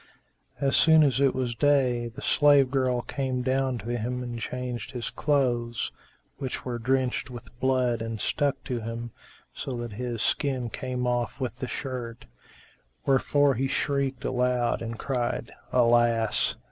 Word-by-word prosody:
As 135 0 +2
soon 160 -1 +7
as 135 -2 +2
it 135 -2 +3
was 125 -2 -1
day, 125 -2 +2
the 125 +4 -9
slave 145 -3 +5
girl 130 -3 +1
came 130 -2 -2
down 130 0 +1
to 115 +1 -7
him 125 +2 -2
and 120 -1 -5
changed 125 +2 -4
his 120 -2 -4
clothes, 120 -6 0 0.5
which 130 -3 -4
were 120 -2 -3
drenched 130 +2 0
with 120 -1 -10
blood 125 -3 +1
and 115 -1 -4
stuck 140 +2 0
to 125 -3 -3
him, 115 +1 -5 0.4
so - - -5
that 120 -1 -5
his 120 0 -3
skin 130 -5 0
came 125 -1 -3
off 120 0 -1
with 125 -2 -4
the 130 - -3
shirt; 125 -3 -5 0.8
wherefor 140 +1 +3
he 135 +2 0
shrieked 135 -2 -1
aloud 125 -1 +1
and 115 0 -5
cried, 125 -1 -2 0.2
"Alas!" 120 -2 +3
125 Hz, 150 wpm, -27 LUFS, 120-135 Hz, 0.8 s, soon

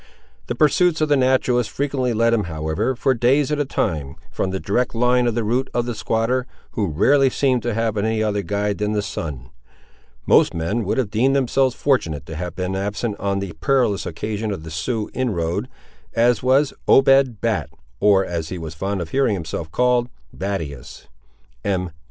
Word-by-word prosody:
The 120 - -2
pursuits 155 +4 +3
of 155 -1 +1
the 145 - +5
naturalist 130 -3 +2
frequently 135 -3 -1
led 115 +1 +2
him, 105 -4 +1
however, 80 +9 -2
for 130 +2 +2
days 130 +5 +2
at 150 - 0
a 145 - +1
time, 75 - -2 0.2
from 95 - -2
the 95 0 -3
direct 120 +6 -1
line 125 +1 +3
of 115 - 0
the 120 - 0
route 125 +5 0
of 120 -1 +1
the 120 - -3
squatter, 115 +5 0 0.2
who 105 -4 -1
rarely 135 - +3
seemed 130 -2 +1
to 120 -1 -2
have 115 -1 0
any 110 +1 0
other 105 -1 0
guide 100 +2 -2
than 105 0 0
the 105 -1 0
sun. 65 -10 -6 0.7
Most - - +4
men 100 +8 -1
would 100 - -1
have 120 -6 0
deemed 130 +5 +2
themselves 130 -1 +2
fortunate 80 - 0
to 80 - -7
have 90 +1 -5
been 90 +1 -2
absent 105 +3 -2
on 100 -1 -1
the 100 -3 -4
perilous 120 -1 +1
occasion 110 0 -3
of 95 -6 -4
the 80 - -8
Sioux 105 +7 -3
inroad, 90 -10 -1 0.5
as 120 +1 +3
was 135 +3 +3
Obed 135 -4 +5
Bat, 110 -8 -1 0.3
(or 95 0 +4
as 85 -2 -4
he 90 - -5
was 80 -2 -6
fond 95 +4 -3
of 80 - -5
hearing 135 -6 +2
himself 80 -2 -5
called, 125 +1 +2 0.2
Battius,) 80 -10 -5 0.6
M. 90 -3 -1
110 Hz, 185 wpm, -21 LUFS, 95-125 Hz, 0.7 s, the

